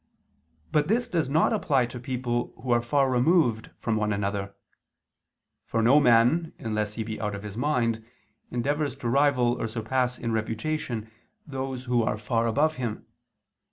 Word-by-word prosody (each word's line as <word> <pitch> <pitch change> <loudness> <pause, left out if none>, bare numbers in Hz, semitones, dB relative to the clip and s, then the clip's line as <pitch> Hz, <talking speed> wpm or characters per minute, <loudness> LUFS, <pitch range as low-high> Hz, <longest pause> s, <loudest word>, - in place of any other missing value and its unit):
But 150 -1 +2
this 235 +5 +1
does 165 -6 0
not 160 +9 +3
apply 140 - +2
to 120 +1 -8
people 125 -2 -2
who 130 - -2
are 120 0 +4
far 135 +3 +2
removed 125 -3 +2
from 115 -2 -1
one 105 0 0
another: 100 -1 -2 1.1
for 115 - 0
no 130 +6 +6
man, 125 +6 +4
unless 105 -2 -2
he 110 - -2
be 110 0 -5
out 105 -1 -2
of 100 - -8
his 105 -1 -7
mind, 115 -3 0 0.5
endeavors 140 +3 -1
to 125 - -5
rival 130 -2 +3
or - - -1
surpass 125 +3 -1
in 115 - -3
reputation 115 +1 -2 0.3
those 135 -3 -4
who 125 -1 +1
are 110 -1 0
far 115 +2 0
above 150 +7 +1
him. 120 -4 -4
120 Hz, 160 wpm, -26 LUFS, 110-140 Hz, 1.1 s, no